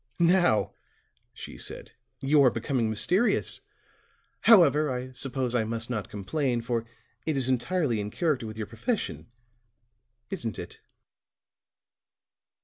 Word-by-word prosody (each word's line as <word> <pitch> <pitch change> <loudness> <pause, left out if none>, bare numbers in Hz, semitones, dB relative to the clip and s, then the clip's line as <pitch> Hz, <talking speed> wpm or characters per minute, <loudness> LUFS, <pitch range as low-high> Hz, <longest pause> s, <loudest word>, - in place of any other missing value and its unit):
"Now," 175 - +3 0.6
she - - -10
said, - - -6 0.3
"you 145 +2 +4
are 130 - +7
becoming 120 0 -1
mysterious. 180 - +3 0.8
However, 155 - +5
I 130 0 -4
suppose 130 -1 -3
I 120 -2 +2
must 115 +2 -3
not 110 -4 -3
complain, 120 +5 -1
for 115 -1 -2 0.4
it 155 -3 0
is 130 -2 +1
entirely 130 0 0
in 105 0 -3
character 145 - -1
with 110 0 -8
your 110 - -3
profession, 205 - -3 1.0
isn't 120 - -4
it?" - - -8
125 Hz, 120 wpm, -27 LUFS, 115-155 Hz, 1.0 s, are